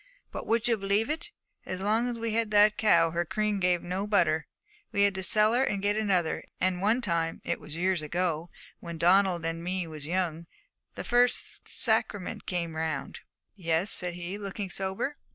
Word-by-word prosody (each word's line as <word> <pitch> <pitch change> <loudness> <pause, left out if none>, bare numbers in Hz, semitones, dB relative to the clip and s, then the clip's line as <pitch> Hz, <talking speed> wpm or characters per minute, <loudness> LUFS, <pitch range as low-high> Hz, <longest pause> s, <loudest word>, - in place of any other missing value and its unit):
But - - -6
would 230 +1 +1
you 230 -2 +2
believe 200 +5 0
it? 325 +6 -4 0.3
as 185 - -5
long 215 +5 +1
as 240 -1 -3
we 230 -1 -2
had 225 -1 +1
that 210 0 +5
cow 170 -7 +4
her 170 +1 0
cream 210 +3 -1
gave 180 -2 +1
no 185 +3 -3
butter. 160 -7 +2 0.4
We 200 -2 +2
had 200 -1 +3
to 190 - -4
sell 210 +4 +3
her 250 +2 +3
and 205 -6 -1
get 205 +1 +1
another. 190 -6 0 0.2
And 185 -1 +1
one 220 +5 +2
time 165 -6 -1
it - - -1
was 150 - -8
years 180 0 +1
ago, 170 +1 -2 0.3
when 170 -1 -7
Donald 175 0 +3
and 165 0 -3
me 185 0 -2
was 155 -2 -8
young 170 -2 -2 0.5
the - - -5
first 245 +1 +1
sacrament 220 -4 +1
came 170 -3 -2
round 160 -3 -3 0.2
' - - -55
'Yes,' 170 +1 0
said 180 -2 -1
he, 180 +3 -5
looking 200 -1 -5
sober. 195 +11 -2
190 Hz, 190 wpm, -28 LUFS, 170-210 Hz, 0.5 s, that